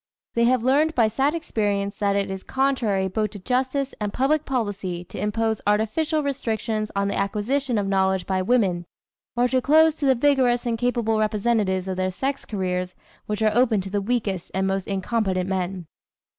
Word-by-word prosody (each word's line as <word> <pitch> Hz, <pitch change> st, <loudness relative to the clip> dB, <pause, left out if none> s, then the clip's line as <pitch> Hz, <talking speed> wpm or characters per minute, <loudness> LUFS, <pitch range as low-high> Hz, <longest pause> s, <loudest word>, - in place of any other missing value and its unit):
They 235 Hz, 0 st, +3 dB
have 250 Hz, -1 st, +2 dB
learned 295 Hz, +5 st, +3 dB
by 230 Hz, -3 st, +4 dB
sad 275 Hz, +8 st, +1 dB
experience 205 Hz, -10 st, -1 dB
that 200 Hz, -1 st, +1 dB
it 200 Hz, -1 st, 0 dB
is 190 Hz, 0 st, -5 dB
contrary 240 Hz, -8 st, 0 dB
both 210 Hz, +3 st, -1 dB
to 205 Hz, -, -9 dB
justice 260 Hz, +5 st, -1 dB
and 205 Hz, -1 st, -1 dB
public 290 Hz, +6 st, +1 dB
policy 200 Hz, -8 st, -2 dB
to 180 Hz, -, -9 dB
impose 220 Hz, +1 st, -1 dB
artificial 295 Hz, +10 st, +1 dB
restrictions 225 Hz, -5 st, -2 dB
on 200 Hz, 0 st, +1 dB
the 200 Hz, -, -2 dB
acquisition 230 Hz, +6 st, -1 dB
of 205 Hz, -, 0 dB
knowledge 190 Hz, -1 st, +1 dB
by 190 Hz, -1 st, 0 dB
women, 185 Hz, -5 st, +1 dB, 0.5 s
or 245 Hz, +1 st, +3 dB
to 255 Hz, 0 st, +2 dB
close 315 Hz, +4 st, +4 dB
to 285 Hz, -, 0 dB
the 265 Hz, -, +5 dB
vigorous 250 Hz, -2 st, +2 dB
and 230 Hz, -2 st, -1 dB
capable 235 Hz, -3 st, +1 dB
representatives 210 Hz, -3 st, +1 dB
of 190 Hz, -1 st, -3 dB
their 185 Hz, 0 st, 0 dB
sex 265 Hz, +9 st, -3 dB
careers 185 Hz, -3 st, -3 dB, 0.3 s
which 210 Hz, +1 st, -2 dB
are 215 Hz, -1 st, +3 dB
open 235 Hz, -4 st, +3 dB
to 190 Hz, 0 st, -7 dB
the 205 Hz, 0 st, 0 dB
weakest 200 Hz, -5 st, -2 dB
and 190 Hz, 0 st, +1 dB
most 195 Hz, 0 st, -1 dB
incompetent 195 Hz, -2 st, -1 dB
men. 185 Hz, -1 st, -2 dB
215 Hz, 185 wpm, -24 LUFS, 195-255 Hz, 0.5 s, the